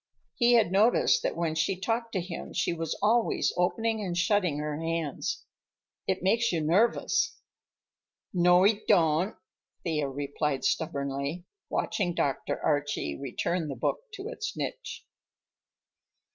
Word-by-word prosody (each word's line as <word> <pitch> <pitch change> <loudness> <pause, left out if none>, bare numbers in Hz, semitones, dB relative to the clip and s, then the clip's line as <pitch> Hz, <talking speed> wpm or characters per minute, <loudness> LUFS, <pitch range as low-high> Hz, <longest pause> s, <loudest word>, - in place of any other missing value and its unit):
He 240 0 +3
had 225 -7 +4
noticed 225 - +4
that - - -1
when 165 -2 -1
she 170 +4 0
talked 230 +3 -2
to 190 - 0
him 170 -1 -7
she - - +1
was 165 -1 -3
always 230 +2 +2
opening 220 +4 0
and 175 -3 -3
shutting 180 -3 +2
her 150 0 -3
hands. 165 -2 -2 0.6
"It - - -1
makes 230 +4 +3
you 170 - 0
nervous." 230 - +2 1.0
"No, 180 0 +5
he 205 +1 +4
don't," 170 +1 +3 0.5
Thea 150 -5 -1
replied 140 0 -2
stubbornly, 140 +2 -2 0.2
watching 175 -4 -1
Dr. 145 +1 -1
Archie 145 - 0
return 160 +5 -2
the 140 - -4
book 120 - -1
to 400 +1 -6
its 455 -2 -5
niche. - - -5
175 Hz, 130 wpm, -28 LUFS, 150-215 Hz, 1.0 s, No